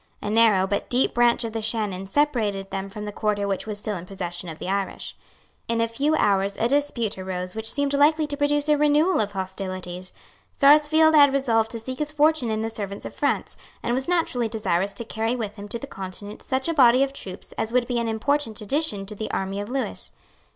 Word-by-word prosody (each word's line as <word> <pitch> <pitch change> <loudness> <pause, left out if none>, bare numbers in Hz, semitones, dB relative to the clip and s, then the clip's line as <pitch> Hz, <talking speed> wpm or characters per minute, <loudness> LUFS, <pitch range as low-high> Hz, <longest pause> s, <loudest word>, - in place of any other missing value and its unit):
A 210 - -4
narrow, 215 -4 +5
but 200 +1 -2
deep 250 +1 +2
branch 240 0 +3
of 225 -1 -4
the 225 - -2
Shannon 210 -4 -1
separated 215 -7 0
them 195 0 -4
from 210 +1 -7
the 210 - -4
quarter 205 -1 -1
which 195 +1 -2
was 210 -1 -4
still 210 0 -3
in 170 - -8
the - - -22
possession 180 -2 -5
of 160 - -7
the - - -6
Irish. 195 0 -3 0.5
In 230 0 0
a 230 - +2
few 280 +7 0
hours 200 -5 +1
a 230 - +2
dispute 245 -7 0
arose 185 0 -4
which 220 0 -2
seemed 285 -1 0
likely 305 +2 +4
to 290 -1 -4
produce 290 0 +1
a 300 -1 +3
renewal 300 +5 +3
of 205 -1 -1
hostilities. 185 -1 -5 0.5
Sarsfield 305 +2 +6
had 285 -2 +7
resolved 230 -5 +2
to 230 - -5
seek 255 +3 -6
his 300 0 -2
fortune 300 -4 +2
in 220 0 -1
the 225 - -1
service 200 -2 -5
of - - -6
France, - - -1 0.3
and 240 - 0
was 260 +1 0
naturally 320 -10 +1
desirous 200 -3 0
to 235 - -5
carry 225 +2 -1
with 220 -3 -5
him 205 0 -8
to 220 - -3
the 255 - -7
Continent 205 -2 -7
such 265 +1 -1
a 335 - +1
body 255 -3 +6
of 275 0 -2
troops 190 -8 -7
as 220 - -3
would 250 0 +2
be 245 -1 -1
an 235 - -1
important 225 +1 0
addition 210 -3 -1
to 210 - -7
the 215 +1 -5
army 195 +1 -2
of 205 - -7
Lewis. 265 +1 -2
225 Hz, 225 wpm, -24 LUFS, 200-275 Hz, 0.5 s, had